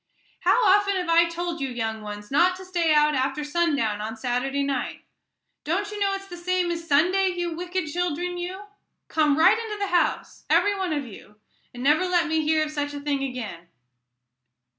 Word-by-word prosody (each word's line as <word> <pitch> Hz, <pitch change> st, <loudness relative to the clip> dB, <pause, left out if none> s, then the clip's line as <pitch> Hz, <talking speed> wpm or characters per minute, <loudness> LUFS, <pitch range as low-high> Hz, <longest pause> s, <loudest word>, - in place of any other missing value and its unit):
"How 485 Hz, -, +3 dB
often 400 Hz, 0 st, +4 dB
have 360 Hz, -2 st, -2 dB
I 335 Hz, +1 st, +5 dB
told 340 Hz, -1 st, -4 dB
you, 270 Hz, -, -1 dB
young 225 Hz, -3 st, -3 dB
ones, 210 Hz, +1 st, -8 dB
not 350 Hz, +6 st, +4 dB
to 375 Hz, +1 st, -10 dB
stay 345 Hz, -3 st, 0 dB
out 300 Hz, 0 st, +4 dB
after 270 Hz, +2 st, -1 dB
sundown 290 Hz, -10 st, 0 dB
on 220 Hz, +1 st, -5 dB
Saturday 255 Hz, +4 st, -1 dB
night? 275 Hz, -2 st, -3 dB, 0.6 s
Don't 395 Hz, +6 st, -1 dB
you 420 Hz, -, -6 dB
know 395 Hz, -1 st, +1 dB
it's 390 Hz, 0 st, -7 dB
the 350 Hz, -2 st, -9 dB
same 360 Hz, 0 st, 0 dB
as 335 Hz, -1 st, -5 dB
Sunday, 360 Hz, +6 st, +3 dB
you 350 Hz, -2 st, -2 dB
wicked 360 Hz, +1 st, -3 dB
children, 355 Hz, +2 st, -2 dB
you? 370 Hz, +3 st, -5 dB, 0.5 s
Come 305 Hz, -2 st, +2 dB
right 325 Hz, +7 st, +5 dB
into 440 Hz, -2 st, -5 dB
the 400 Hz, -3 st, -1 dB
house, 350 Hz, -, 0 dB
every 410 Hz, 0 st, +3 dB
one 380 Hz, -3 st, -2 dB
of 290 Hz, -3 st, -1 dB
you, 210 Hz, -2 st, -13 dB, 0.4 s
and 245 Hz, 0 st, -8 dB
never 305 Hz, +6 st, +3 dB
let 350 Hz, -1 st, +2 dB
me 320 Hz, 0 st, +1 dB
hear 310 Hz, 0 st, +2 dB
of 305 Hz, -, -7 dB
such 290 Hz, -1 st, -3 dB
a -, -, -4 dB
thing 285 Hz, -1 st, -1 dB
again." 220 Hz, -10 st, -6 dB
325 Hz, 195 wpm, -25 LUFS, 280-360 Hz, 0.6 s, I